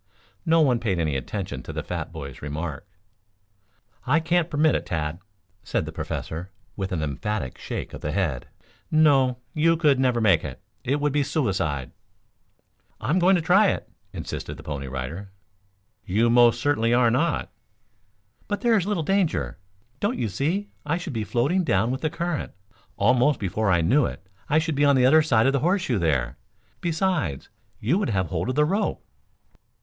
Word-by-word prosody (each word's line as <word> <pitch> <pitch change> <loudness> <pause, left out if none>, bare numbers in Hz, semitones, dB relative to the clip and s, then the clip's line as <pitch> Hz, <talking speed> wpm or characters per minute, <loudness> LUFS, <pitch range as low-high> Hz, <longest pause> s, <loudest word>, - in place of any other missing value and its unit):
No 165 0 +5
one 130 -6 +3
paid 105 -6 -1
any 80 -4 0
attention 70 - -4
to - - -8
the - - -4
fat - - -4
boy's 70 -2 -8
remark. 75 +2 -5 1.2
"I 145 +6 +4
can't 170 +1 +1
permit 155 0 +3
it, - - -2
Tad," 80 0 -2 0.4
said - - -1
the - - -6
Professor, 85 +4 -5 0.3
with 95 -1 -4
an 80 -4 -1
emphatic 75 - -3
shake - - -5
of - - -8
the 75 - -2
head. 80 -8 -1 0.4
"No, 140 -5 +4 0.2
you 165 +2 +3
could 150 -5 +3
never 125 -2 +2
make 100 -8 +4
it. 70 -4 -6 0.2
It 140 +4 0
would 145 -1 0
be 145 - +2
suicide." 95 - -1 1.1
"I'm 150 +12 +1
going 185 +2 +5
to 170 - 0
try 195 +5 +5
it," - - -2 0.2
insisted - - -6
the - - -11
Pony 70 -2 -5
Rider. 70 +10 -5 0.7
"You 115 +5 +2
most 120 -1 +5
certainly 120 -5 +2
are 120 -2 +4
not." 155 +8 0 1.0
"But 205 - -2
there 235 -2 +4
is 190 -1 -1
little 200 -6 0
danger. 120 - 0 0.4
Don't 235 +5 0
you 115 - -1
see 165 - -1
I 150 +3 0
should 170 -5 -6
be 110 -2 -2
floating 140 - +1
down 110 - +1
with 130 - -3
the 155 - 0
current. 170 -1 -3 0.4
Almost 125 +2 +3
before 100 +2 -1
I 85 -3 +3
knew 125 - +3
it 95 +2 -9 0.2
I 150 - +3
should 160 0 +1
be 145 +1 +1
on 140 -1 +5
the 125 -1 +4
other 155 +5 +6
side 120 -8 +3
of 135 - +3
the 140 - +2
horseshoe 175 - +1
there. 70 -8 0 0.4
Besides 165 - -1 0.3
you 150 - +1
would 205 - -1
have 95 -5 0
hold - - -2
of 130 - -1
the 150 - +4
rope." 195 +7 -1
125 Hz, 180 wpm, -25 LUFS, -, 1.2 s, other